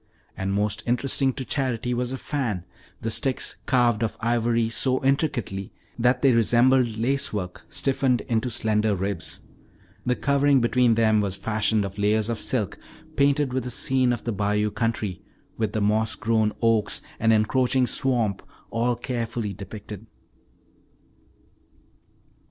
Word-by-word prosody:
And 95 0 -2
most 105 +2 0
interesting 130 +2 +1
to 130 - -5
Charity 125 -3 -1
was 125 +1 -1
a 130 - -3
fan, 115 - -3 0.4
the 115 - -2
sticks 130 +3 0
carved 120 -4 +3
of 115 - -2
ivory 115 0 +1
so 130 +3 0
intricately 125 - -1 0.3
that 125 +2 +2
they 135 - +6
resembled 120 +1 +3
lacework 110 -7 -1
stiffened 135 -3 0
into 115 0 -1
slender 110 -2 +1
ribs. 100 +2 -4 0.6
The 125 - +1
covering 140 0 +3
between 120 -1 +3
them 110 -2 +3
was 100 -2 -2
fashioned 105 +1 0
of 100 +1 -7
layers 105 +2 +2
of 115 - -2
silk 110 -7 -1 0.4
painted 140 -1 +2
with 130 -1 -1
a - - -3
scene 130 0 +2
of 120 - -3
the 120 - -2
bayou 105 +1 0
country, 110 -5 -2 0.4
with 110 -3 -1
the 110 - -1
moss 110 +2 +1
grown 110 -3 +1
oaks 115 -2 +2 0.2
and 115 0 +3
encroaching 125 +4 +2
swamp 120 -7 0 0.3
all 120 +1 +1
carefully 115 -3 -3
depicted. 105 +2 -9
115 Hz, 140 wpm, -25 LUFS, 105-125 Hz, 0.6 s, they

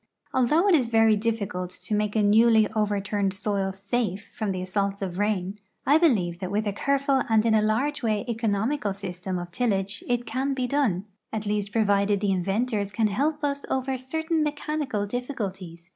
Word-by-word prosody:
Although 300 +9 +3
it 390 - +5
is 260 -6 +2
very 225 -1 +4
difficult 205 -5 -2
to 185 +3 -6
make 210 0 0
a 215 - +3
newly 220 +1 +5
overturned 205 -2 0
soil 195 -1 -1
safe 200 +1 -3
from 215 -3 -1
the 185 -1 -3
assaults 200 +1 -1
of 185 -2 -3
the 180 - -6
rain, 205 -1 -1 0.3
I 295 +3 +5
believe 190 - +2
that 185 - -4
with 210 +2 -1
a 205 - -1
careful 275 +4 +1
and 220 0 +3
in 225 - +3
a 215 - +4
large 250 +8 0
way 215 -4 0
economical 225 0 0
S3^stem 185 -1 -5
of 175 0 -7
tillage 200 -2 -1
it 245 0 0
can 265 +4 -1
be 255 -1 -1
done, 245 -9 0 0.3
at 215 -1 -3
least 205 -1 -1
provided 205 -2 +2
the 205 -1 +1
inventors 200 +3 0
can 215 +1 +1
help 295 +8 -1
us 280 -1 -1
over 265 0 -1
certain 320 +5 -1
me 300 - +2
chanical 290 -9 -2
difficulties. 195 -8 -5
215 Hz, 190 wpm, -26 LUFS, 200-250 Hz, 0.3 s, it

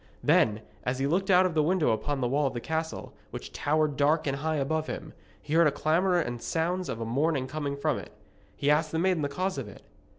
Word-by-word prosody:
Then, 110 0 +3 0.2
as 125 +1 -1
he 135 - 0
looked 185 +7 0
out 185 0 +6
of 180 - 0
the 155 - +3
window 165 -3 +2
upon 135 +5 -1
the 120 - +1
wall 140 +3 +1
of 130 - -5
the - - -1
castle, 160 +5 -4 0.2
which - - -8
towered 155 -1 0
dark 150 +2 +2
and 135 -1 -1
high 155 +2 -1
above 155 +2 -1
him, 155 -1 -6 0.3
he 150 - -6
heard 165 0 +6
a - - +2
clamour 175 +6 +2
and 120 -7 -3
sounds 175 +3 -1
of 115 - -4
a 115 - -3
mourning 135 +3 0
coming 145 0 -3
from 140 - 0
it. - - -11 0.4
He 145 - +1
asked 155 +1 +2
the 160 - -1
maiden 180 -1 +2
the 145 - -1
cause 185 +2 -2
of 125 - -5
it. 100 - -13
155 Hz, 240 wpm, -28 LUFS, 140-165 Hz, 0.4 s, out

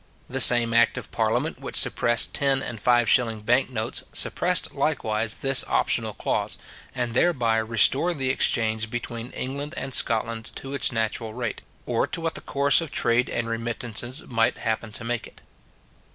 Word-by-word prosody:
The 135 - -4
same 120 -2 +8
act 115 0 +2
of - - -8
parliament - - -2
which - - -6
suppressed 120 -1 +3
ten 135 -1 +1
and 120 -3 -7
five 120 0 +2
shilling 115 -4 +1
bank 125 +5 +1
notes, 110 -3 -2
suppressed - - +1
likewise 110 0 -2
this 135 -1 +5
optional - - 0
clause, - - -1 0.4
and 120 -2 -3
thereby 120 -6 +1
restored 115 +9 +2
the 130 -1 0
exchange 110 -3 -1
between 120 0 -7
England 140 +5 -6
and 135 -1 -5
Scotland 115 -1 +1
to 135 +1 -8
its 140 - +1
natural 110 -1 -3
rate, 120 -4 -5 0.2
or - - -1
to - - -3
what 165 0 -3
the - - -7
course 140 +2 +2
of 165 - -6
trade 120 -2 0
and 115 -1 -3
remittances 115 +3 -4
might 115 0 -1
happen 110 -1 -4
to 115 - -7
make 120 0 -4
it. - - -19
120 Hz, 165 wpm, -23 LUFS, 115-135 Hz, 0.4 s, same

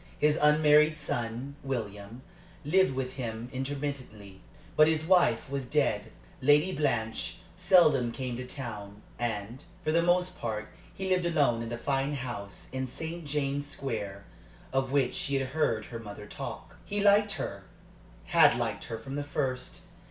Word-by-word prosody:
His 150 0 +3
unmarried 150 +1 +5
son, 120 +1 -3
William, 110 -2 -5 0.4
lived 185 -2 +3
with 130 0 -3
him 115 -1 -4
intermittently; 130 -8 -5 0.3
but 155 - +7
his 160 -1 +1
wife 175 -10 +4
was 135 -2 -3
dead. 125 -7 +1 0.3
Lady 150 +7 +4
Blanche 115 -7 -1 0.2
seldom 140 -9 +5
came 125 -1 -4
to 125 0 -6
town, 105 -6 -7 0.2
and, 115 +2 -3 0.2
for 155 - +1
the 165 +1 +4
most 180 +1 +1
part, 110 -2 -3 0.2
he 190 0 -4
lived 180 -2 +2
alone 145 -9 +2
in 115 - -4
the 120 - -3
fine 135 +3 0
house 120 -7 -6
in 130 0 -2
St. 160 +5 -5
James's 145 0 -1
Square, 105 -8 -4 0.5
of 135 -1 +1
which 135 -3 +2
she 140 - -1
had 135 -1 0
heard 130 -7 0
her 115 - -7
mother 105 -2 -8
talk. - - -8
He 205 - -3
liked 205 0 +5
her - - -5 0.6
had - - +5
liked - - -2
her 115 - -4
from 125 +5 -8
the 145 - -2
first. 135 -3 -3
135 Hz, 155 wpm, -29 LUFS, 115-150 Hz, 0.6 s, but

